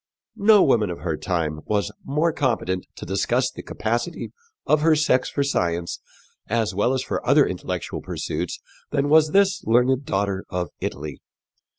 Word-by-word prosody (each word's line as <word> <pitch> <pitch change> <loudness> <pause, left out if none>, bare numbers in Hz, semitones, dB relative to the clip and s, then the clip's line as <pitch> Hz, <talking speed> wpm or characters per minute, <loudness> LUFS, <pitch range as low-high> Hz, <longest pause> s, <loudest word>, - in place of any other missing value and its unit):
No 205 -1 +6
woman 110 -7 +3
of 85 -4 -6
her 80 -1 -1
time 80 -3 -2
was 105 -1 0
more 155 +4 +1
competent 110 -10 -1
to - - -8
discuss - - 0
the - - -9
capacity 120 +9 -3 0.3
of 150 0 +3
her 160 0 +5
sex 150 -4 +2
for 140 - 0
science 85 -10 -1 0.5
as 110 -2 0
well 105 +7 +1
as 130 - -1
for - - -3
other - - +5
intellectual - - -4
pursuits - - -4 0.3
than 145 -1 0
was 155 0 +6
this 195 +3 +3
learned 125 +4 +2
daughter 100 -2 -1
of 90 -2 -2
Italy. 75 0 -5
120 Hz, 160 wpm, -23 LUFS, 95-150 Hz, 0.5 s, No